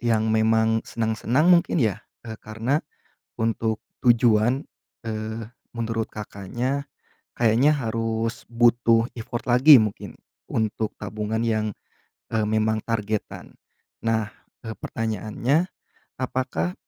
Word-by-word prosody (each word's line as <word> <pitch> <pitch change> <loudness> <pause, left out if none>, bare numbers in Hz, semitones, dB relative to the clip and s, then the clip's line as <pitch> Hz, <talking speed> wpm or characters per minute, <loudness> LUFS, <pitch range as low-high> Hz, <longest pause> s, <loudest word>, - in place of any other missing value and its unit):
yang 115 -2 +1
memang 110 0 +3
senang-senang 120 +9 +2
mungkin 170 0 +3
ya? 110 - +1 0.2
E 110 -1 -7
karena 115 +7 -1 0.6
untuk 110 -1 -1 0.2
tujuan, 120 +2 +3 0.4
eee, 110 0 -4 0.3
menurut 115 -1 -2
Kakaknya 120 +7 -4 0.5
kayaknya 120 +5 +4
harus 115 -2 -2
butuh 115 -1 +4
effort 120 +1 -6
lagi 130 +3 +8
mungkin, 105 -2 -4 0.3
untuk 110 0 -1
tabungan 105 +2 -3
yang, 110 -1 +1 0.7
eee, 110 -1 +1
memang 110 0 +1
targetan. 110 -2 -3 0.5
Nah, 110 -2 0 0.3
eee, 110 -1 -6
pertanyaannya, 115 - -1 0.5
apakah, 130 +7 -2
115 Hz, 100 wpm, -24 LUFS, 110-120 Hz, 0.7 s, lagi